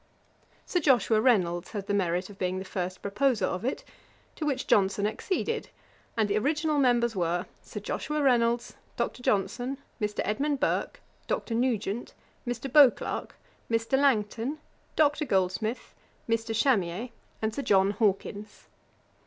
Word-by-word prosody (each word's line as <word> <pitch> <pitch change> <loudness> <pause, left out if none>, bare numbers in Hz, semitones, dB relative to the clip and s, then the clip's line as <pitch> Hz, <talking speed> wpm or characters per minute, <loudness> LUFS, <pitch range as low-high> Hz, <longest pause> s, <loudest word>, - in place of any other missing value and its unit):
Sir 360 - 0
Joshua 245 -7 +3
Reynolds 185 -8 +2
had 205 -2 -4
the 205 - -2
merit 180 -2 0
of 195 - -15
being 185 0 -1
the 190 - -5
first 185 -1 -4
proposer 235 +4 +1
of 185 - -3
it, 260 - -2 0.5
to 305 - -3
which 270 -3 -1
Johnson 200 0 +3
acceded, 410 - -2 0.5
and 220 -2 +3
the 205 +1 +1
original 300 +3 +1
members 240 -3 +3
were, 175 -1 0 0.2
Sir - - -7
Joshua 300 0 -3
Reynolds, 240 -2 +2 0.2
Dr. 235 +1 -2
Johnson, 245 +5 0 0.2
Mr. 210 0 -1
Edmund 275 +7 0
Burke, - - -1 0.3
Dr. 230 - -2
Nugent, 230 -2 -1 0.3
Mr. 245 +2 -3
Beauclerk, 285 -5 +4 0.3
Mr. 230 +2 +1
Langton, 255 0 +1 0.4
Dr. 300 0 +3
Goldsmith, 195 +2 -1 0.3
Mr. 225 0 0
Chamier, 220 -2 +1 0.3
and 220 0 -1
Sir 280 - -3
John 195 -5 +3
Hawkins. 205 0 -2
225 Hz, 135 wpm, -28 LUFS, 200-260 Hz, 0.5 s, Beauclerk